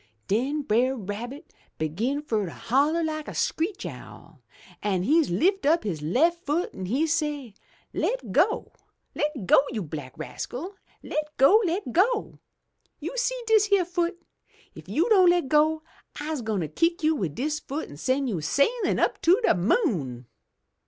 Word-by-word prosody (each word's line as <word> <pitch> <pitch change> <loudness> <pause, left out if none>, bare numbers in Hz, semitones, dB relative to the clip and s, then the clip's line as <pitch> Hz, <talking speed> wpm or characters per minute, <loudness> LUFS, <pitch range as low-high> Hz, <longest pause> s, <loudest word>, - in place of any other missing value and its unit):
Den 270 +8 0
Brer 255 +3 +2
Rabbit 235 +6 -7 0.2
begin 225 - -2
fur 220 -8 -1
to - - -6
holler 290 - +1
like 310 -1 -3
a - - -7
screech 360 +5 -1
owl, - - -10 0.4
an' 190 -3 0
he 320 - +4
lift 370 - +1
up 330 +3 +3
his 170 -8 -3
left 325 - +1
foot 305 +5 -1
an' 190 -1 -6
he 265 - +1
say, 295 -7 -2 0.4
'Le' - - +1 0.2
go! - - +2 0.4
Le' 295 -9 -2
go, - - +6
you 220 -5 -3
black 145 -4 -8
rascal! 255 - -6 0.3
Le' 305 - -1 0.2
go! 375 +12 +6
Le' 355 +3 0
go! 420 - +1 0.6
You - - -5
see - - 0
dis 435 -2 +4
yere 395 -3 +4
foot? 345 0 -2 0.5
If - - -13
you 335 +7 +1
don' 375 -5 +6
le' 350 0 +3
go, 310 +3 +2 0.4
I'se 300 -2 -3
gwine 210 -7 -2
kick 330 - 0
you 315 +1 +4
wid 175 - -3
dis 300 - -1
foot 300 +1 -5
an' 145 - -11
sen' 260 - 0
you 200 -11 -2
sailin' 280 - +1
up - - 0
to 355 +6 +5
de - - +5
moon!' 175 - 0
290 Hz, 165 wpm, -26 LUFS, 210-335 Hz, 0.6 s, go